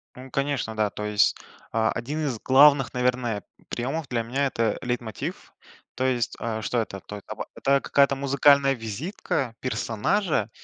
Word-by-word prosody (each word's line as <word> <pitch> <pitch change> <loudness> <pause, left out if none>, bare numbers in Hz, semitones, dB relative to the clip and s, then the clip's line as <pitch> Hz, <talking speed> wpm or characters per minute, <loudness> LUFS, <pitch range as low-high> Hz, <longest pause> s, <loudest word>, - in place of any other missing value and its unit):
М, 130 0 -11
конечно, 140 -5 -1
да, 105 -1 +1
то 105 - -6
есть, 105 -1 +3 0.4
а, 110 0 +2
один 145 +7 -3
из 120 -6 -2
главных, 135 -1 +6
наверное, 125 -4 0 0.3
приемов 135 +5 -3
для 115 -2 -1
меня- 135 +5 -1
это 115 -4 0
лейтмотив, 120 -3 -4 0.4
то 130 - -1
есть, 120 -3 0
а, 110 -1 -3
что 120 +3 0
это? 100 -3 -6
То 105 - -8
эт 100 - -12
аба - - -6
Это 140 0 +2
какая-то 140 -1 +3
музыкальная 140 0 +4
визитка 120 - -3
персонажа, 115 - 0
125 Hz, 160 wpm, -25 LUFS, 110-140 Hz, 0.4 s, главных